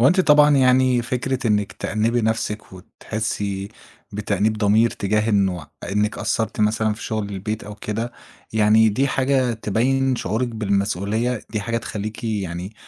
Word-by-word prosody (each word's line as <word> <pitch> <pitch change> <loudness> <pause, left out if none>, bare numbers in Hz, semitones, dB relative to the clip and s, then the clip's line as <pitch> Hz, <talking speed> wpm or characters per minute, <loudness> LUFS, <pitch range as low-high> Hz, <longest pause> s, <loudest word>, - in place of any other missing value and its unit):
هو 125 - +6
أنتِ 185 +4 +3
طبعًا 150 -3 +6
يعني 130 -1 +4
فكرة 125 +1 -2
إنِّك 105 -2 +1
تأنِّبي 115 +3 0
نفسِك 110 -2 -2
وتحسّي 100 0 -4 0.4
بتأنيب 105 +1 0
ضمير 110 +2 +3
تجاه 105 +2 0
إنه 95 -6 +1 0.3
إنِّك 105 +2 0
قصّرتِ 110 -1 -1
مثلًا 110 0 +2
في 110 - -10
شُغل 110 -2 -2
البيت 105 +3 -4
أو 105 +1 -8
كده، 110 +3 -4 0.4
يعني 110 +1 +5
دي 130 +7 +1
حاجة 130 -2 +1
تبيّن 125 +5 0
شعورِك 115 +5 -1
بالمسؤولية 105 +2 -1
دي 110 - -2
حاجة 115 +3 -2
تخلّيكِ 110 0 -5
يعني 95 -3 -3
110 Hz, 145 wpm, -22 LUFS, 105-120 Hz, 0.4 s, هو